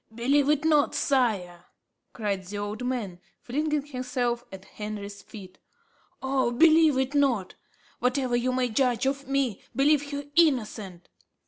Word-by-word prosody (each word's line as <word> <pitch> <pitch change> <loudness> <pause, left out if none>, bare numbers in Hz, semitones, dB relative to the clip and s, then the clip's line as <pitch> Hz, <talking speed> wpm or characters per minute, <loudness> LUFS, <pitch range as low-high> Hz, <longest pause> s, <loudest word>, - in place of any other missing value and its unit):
"Believe 275 +4 +2
it 300 0 +2
not, 300 -2 +3
sire," 200 -10 0 0.5
cried 200 -4 -3
the 205 +2 -6
old 205 +3 -4
man, 230 -8 -3 0.2
flinging 300 +2 -2
himself 250 -3 -2
at 190 0 -10
Henry's 205 -1 -7
feet; 190 -4 -12 0.6
"oh, 265 -2 +1
believe 315 +2 +5
it 265 +1 0
not. 260 -10 +1 0.5
Whatever 250 0 0
you 245 +1 +1
may 255 0 +1
judge 245 +1 +1
of 275 0 -2
me, 270 -6 -1
believe 285 +1 +3
her 285 0 -4
innocent. 215 - +1
250 Hz, 135 wpm, -26 LUFS, 210-280 Hz, 0.6 s, believe